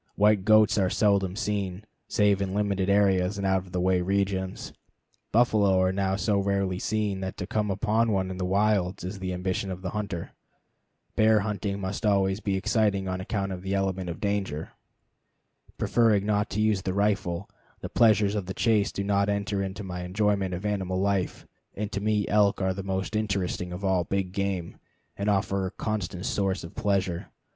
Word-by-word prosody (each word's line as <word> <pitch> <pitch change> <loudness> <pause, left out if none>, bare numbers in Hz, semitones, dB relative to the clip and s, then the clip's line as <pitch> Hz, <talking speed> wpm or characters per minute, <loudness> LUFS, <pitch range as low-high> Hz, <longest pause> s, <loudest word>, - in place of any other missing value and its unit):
White 105 -2 +3
goats 110 0 +5
are 95 -2 +2
seldom 100 -2 +2
seen, 100 -2 -2 0.2
save 100 -1 +2
in 95 0 -2
limited 100 -2 0
areas 100 -1 +3
and 100 - -2
out 95 0 +3
of - - -15
the 90 - -1
way 90 0 +2
regions. 95 0 -1 0.6
Buffalo 105 -5 +4
are 95 0 +3
now 95 0 0
so 100 0 +1
rarely 100 -2 0
seen 105 -2 -1
that 95 0 -5
to 90 - -4
come 105 +2 -1
upon 110 +3 +1
one 95 -2 0
in 95 - -6
the - - -1
wilds 100 -1 +1
is 95 +2 -5
the 95 -1 -3
ambition 95 +2 -2
of 90 0 -6
the 90 - -3
hunter. 100 -5 -4 0.8
Bear 110 -1 +4
hunting 100 -1 -2
must 95 +2 -4
always 100 -2 +2
be 100 -3 -1
exciting 100 -1 +1
on 95 0 -2
account 100 0 -2
of 90 -1 -5
the 95 +1 -2
element 95 -2 -1
of 85 - -5
danger. 100 -7 -2 1.1
Preferring 110 -4 +3
not 105 0 +1
to 105 - -1
use 105 -3 +2
the 95 0 -3
rifle, 100 -3 0 0.3
the - - -4
pleasures 105 -3 +4
of 100 -4 -3
the 95 - -5
chase 110 -4 +2
do 100 - -3
not 100 0 +1
enter 100 0 -1
into 95 +2 -4
my 90 -2 -5
enjoyment 100 0 0
of 90 +4 -6
animal 95 -3 -1
life, 100 -1 -1 0.3
and 105 +1 -4
to 100 - -3
me 105 -1 +1
elk 100 -1 +3
are 95 -1 +1
the 95 - -5
most 95 +1 -3
interesting 100 -4 -1
of 90 +3 -5
all 95 -2 +2
big 95 +1 -2
game, 95 -3 -3 0.4
and 100 +1 -1
a 100 -2 +3 0.3
constant 100 -4 -3
source 95 -1 -1
of 85 - -9
pleasure. 95 -4 -1
100 Hz, 185 wpm, -27 LUFS, 95-105 Hz, 1.1 s, goats